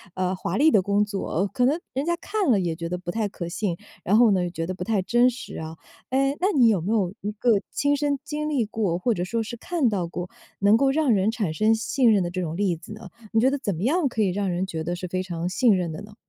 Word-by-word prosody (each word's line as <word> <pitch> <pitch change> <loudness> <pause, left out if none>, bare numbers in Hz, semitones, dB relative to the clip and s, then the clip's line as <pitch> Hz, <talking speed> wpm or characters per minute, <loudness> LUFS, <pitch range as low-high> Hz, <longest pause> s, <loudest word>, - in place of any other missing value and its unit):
呃， 185 0 -1
华 180 0 -3
丽 315 +3 +5
的 205 - +5
工 200 +2 +2
作， 195 -2 -2
可 250 -2 +2
能 290 +5 +2 0.2
人 270 +2 -1
家 345 +1 +1
看 400 -3 -1
了 205 - +4
也 170 -3 -1
觉 170 0 -5
得 180 - -2
不 180 -1 -5
太 215 +1 -1
可 175 -3 -6
信。 180 -1 -2 0.3
然 205 +4 +3
后 235 -3 +6
呢， 180 -2 +1
觉 165 -1 -4
得 185 - -3
不 180 - -5
太 215 -4 +1
真 240 +6 +3
实 250 - -8
啊。 160 0 -6 0.3
哎， 275 +2 +1
那 370 - +2
你 240 -3 +6
有 200 -5 +2
没 195 +6 -2
有 195 -4 +1
一 210 - -3
个 235 +3 -1 0.2
亲 285 0 +1
身 285 -1 0
经 300 +1 -3
历 260 -7 +1
过， 205 -5 -1
或 235 +5 +1
者 175 - -2
说 230 +4 -1
是 230 - -6
看 320 -2 0
到 185 -5 -1
过， 180 +2 -6 0.3
能 205 +3 +5
够 275 +1 +3
让 300 -3 +2
人 195 +1 +2
产 205 -9 -2
生 220 +6 +3
信 240 +1 +2
任 195 -3 +3
的 175 - -3
这 185 0 -3
种 165 -2 -3
例 190 -2 +1
子 170 +6 -11
呢？ 215 +1 -10 0.2
你 225 - +4
觉 260 - +5
得 285 - 0
怎 205 -9 -2
么 170 - -5
样 305 +5 +2
可 225 -3 -2
以 195 - +3
让 195 +1 -1
人 180 +2 -1
觉 160 -4 -4
得 175 - -2
是 180 - -6
非 185 +1 -1
常 175 -2 -4
信 220 +1 +3
任 175 -3 -1
的 155 - -7
呢？ 210 0 -12
205 Hz, 300 characters per minute, -24 LUFS, 180-245 Hz, 0.3 s, 后